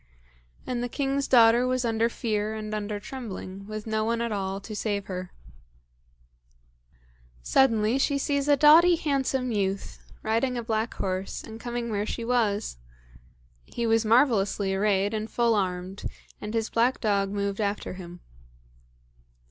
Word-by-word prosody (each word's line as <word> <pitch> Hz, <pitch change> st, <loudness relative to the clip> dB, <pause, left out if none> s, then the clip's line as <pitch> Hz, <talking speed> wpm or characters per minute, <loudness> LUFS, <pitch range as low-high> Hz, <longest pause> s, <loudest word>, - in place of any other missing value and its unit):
And 245 Hz, -1 st, -2 dB
the 245 Hz, -, -2 dB
king's 275 Hz, +1 st, -1 dB
daughter 235 Hz, 0 st, +6 dB
was 255 Hz, -1 st, 0 dB
under 230 Hz, 0 st, +1 dB
fear 215 Hz, -3 st, -2 dB
and 215 Hz, 0 st, -5 dB
under 210 Hz, 0 st, -3 dB
trembling, 200 Hz, -5 st, -7 dB
with 215 Hz, 0 st, -6 dB
no 220 Hz, -1 st, 0 dB
one 230 Hz, +1 st, 0 dB
at 235 Hz, -1 st, -2 dB
all 195 Hz, -1 st, -2 dB
to 215 Hz, +2 st, -8 dB
save 205 Hz, -2 st, -2 dB
her. 185 Hz, -1 st, -6 dB, 2.1 s
Suddenly 225 Hz, -, +3 dB
she 280 Hz, +1 st, +1 dB
sees 280 Hz, 0 st, 0 dB
a 290 Hz, -1 st, +5 dB
doughty 325 Hz, +5 st, +7 dB
handsome 270 Hz, -5 st, -1 dB
youth, 195 Hz, -2 st, -2 dB, 0.2 s
riding 230 Hz, +3 st, 0 dB
a 235 Hz, -, -3 dB
black 225 Hz, 0 st, -1 dB
horse, 190 Hz, 0 st, -3 dB
and 225 Hz, 0 st, -9 dB
coming 240 Hz, -1 st, -4 dB
where 205 Hz, 0 st, -1 dB
she 230 Hz, -, -4 dB
was. 215 Hz, -, 0 dB, 0.9 s
He 235 Hz, -, -4 dB
was 225 Hz, 0 st, +3 dB
marvellously 215 Hz, -5 st, +3 dB
arrayed 200 Hz, +1 st, +1 dB
and 215 Hz, 0 st, -3 dB
full 235 Hz, -1 st, +2 dB
armed, 185 Hz, -1 st, -2 dB, 0.4 s
and 210 Hz, +2 st, -5 dB
his 225 Hz, -1 st, -1 dB
black 240 Hz, +3 st, +2 dB
dog 200 Hz, -3 st, +1 dB
moved 200 Hz, +1 st, -2 dB
after 205 Hz, -2 st, -2 dB
him. 175 Hz, -1 st, -10 dB
220 Hz, 150 wpm, -26 LUFS, 200-245 Hz, 2.1 s, doughty